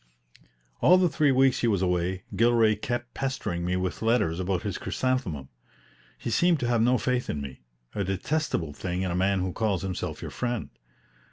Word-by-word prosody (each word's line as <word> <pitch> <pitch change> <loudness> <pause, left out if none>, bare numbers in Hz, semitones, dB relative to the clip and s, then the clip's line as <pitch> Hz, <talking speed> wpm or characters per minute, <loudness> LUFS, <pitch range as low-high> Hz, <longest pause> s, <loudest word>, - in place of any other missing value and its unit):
All 180 +3 +6
the 180 -1 +3
three 150 -2 +3
weeks 130 0 +4
he 120 - +1
was 100 -4 +2
away, 90 +1 0
Gilray 115 -2 +4
kept 120 +3 -4
pestering 110 -10 -2
me 90 +1 0
with 90 0 -2
letters 110 -8 +2
about 95 0 -1
his - - -3
chrysanthemum. 110 - -2 0.7
He 115 - -4
seemed 170 +7 +3
to 120 - 0
have 120 -2 +2
no 125 +2 +4
faith 125 0 -1
in 75 - -2
me 70 -2 -8 0.3
a 100 - -1
detestable 95 - -1
thing 90 +4 -3
in 95 - -1
a - - -1
man 95 +1 +2
who 90 -1 -2
calls 105 -5 0
himself 95 -2 -4
your - - -6
friend. 120 -3 -3
105 Hz, 185 wpm, -27 LUFS, 90-125 Hz, 0.7 s, All